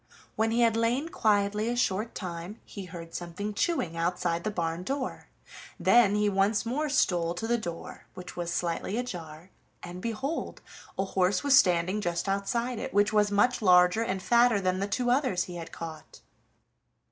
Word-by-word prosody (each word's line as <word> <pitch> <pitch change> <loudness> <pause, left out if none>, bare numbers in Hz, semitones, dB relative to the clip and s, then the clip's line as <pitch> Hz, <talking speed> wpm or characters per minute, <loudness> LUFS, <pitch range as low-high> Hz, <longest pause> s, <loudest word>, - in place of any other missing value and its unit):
When 220 +1 +1
he 230 +2 +1
had 230 -2 +4
lain 240 +7 0
quietly 210 -2 +1
a 240 - -1
short 225 -2 -1
time, 175 +2 -6
he 200 -2 -8
heard 170 -2 -10
something 180 +5 -5
chewing 200 - -1
outside 170 0 -1
the - - -1
barn 170 -4 -2
door; 265 +7 -4 0.5
then 230 -4 +5
he 210 0 +2
once 200 +2 +1
more 295 +6 -1
stole 175 -10 +1
to 200 - -4
the 235 +1 +1
door, 170 -5 -7
which 180 0 -9
was 175 -1 -3
slightly 175 +4 -2
ajar, 175 -7 -6 0.3
and 180 +1 -8
behold, 245 - -4 0.3
a 195 - 0
horse 190 0 +1
was 285 -1 +5
standing 185 -1 +3
just 175 0 -2
outside 235 +5 -1
it, - - -6
which 205 +1 +3
was 210 -1 +3
much 210 +5 +2
larger 180 +1 +5
and 190 -4 -2
fatter 235 -2 +4
than 185 -1 0
the 200 - -1
two 245 +3 0
others 250 -9 +1
he 175 -1 -8
had 165 -1 -8
caught. 160 -2 -9
200 Hz, 175 wpm, -28 LUFS, 175-230 Hz, 0.5 s, then